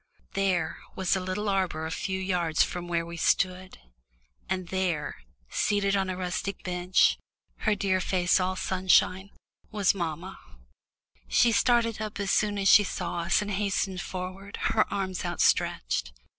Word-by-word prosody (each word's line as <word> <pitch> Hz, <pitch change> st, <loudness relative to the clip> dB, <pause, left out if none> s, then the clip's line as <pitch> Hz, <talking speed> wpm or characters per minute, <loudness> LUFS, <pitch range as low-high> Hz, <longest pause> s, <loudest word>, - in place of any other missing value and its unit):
"There" 185 Hz, -5 st, 0 dB, 0.2 s
was 190 Hz, -1 st, +1 dB
a -, -, 0 dB
little 185 Hz, +3 st, -3 dB
arbour 185 Hz, -5 st, 0 dB
a 160 Hz, -, -4 dB
few 190 Hz, +3 st, -3 dB
yards 175 Hz, -4 st, +1 dB
from 175 Hz, -1 st, -5 dB
where 170 Hz, -1 st, -1 dB
we 170 Hz, 0 st, -8 dB
stood, 185 Hz, +2 st, 0 dB, 0.7 s
and 185 Hz, -2 st, -2 dB
there, 180 Hz, -5 st, -1 dB, 0.3 s
seated 200 Hz, -1 st, +1 dB
on 190 Hz, -1 st, 0 dB
a 185 Hz, -, -3 dB
rustic 185 Hz, +2 st, -3 dB
bench, 180 Hz, 0 st, +2 dB, 0.5 s
her 210 Hz, -, +3 dB
dear 190 Hz, -2 st, 0 dB
face 180 Hz, 0 st, +2 dB
all 185 Hz, 0 st, 0 dB
sunshine, 190 Hz, +1 st, +2 dB, 0.4 s
was 205 Hz, -3 st, +2 dB
mamma! 175 Hz, 0 st, -5 dB, 0.9 s
She 235 Hz, -, +4 dB
started 230 Hz, -2 st, +2 dB
up 215 Hz, -1 st, -5 dB
as 200 Hz, -1 st, 0 dB
soon 205 Hz, -1 st, +1 dB
as 195 Hz, -1 st, 0 dB
she 205 Hz, -, +8 dB
saw 180 Hz, -3 st, -4 dB
us 170 Hz, +4 st, +2 dB
and 205 Hz, -, -5 dB
hastened 195 Hz, -2 st, -1 dB
forward, 185 Hz, +2 st, -6 dB, 0.2 s
her 215 Hz, -, +2 dB
arms 190 Hz, -2 st, -2 dB
outstretched. 60 Hz, -, +1 dB
185 Hz, 150 wpm, -27 LUFS, 180-195 Hz, 0.9 s, she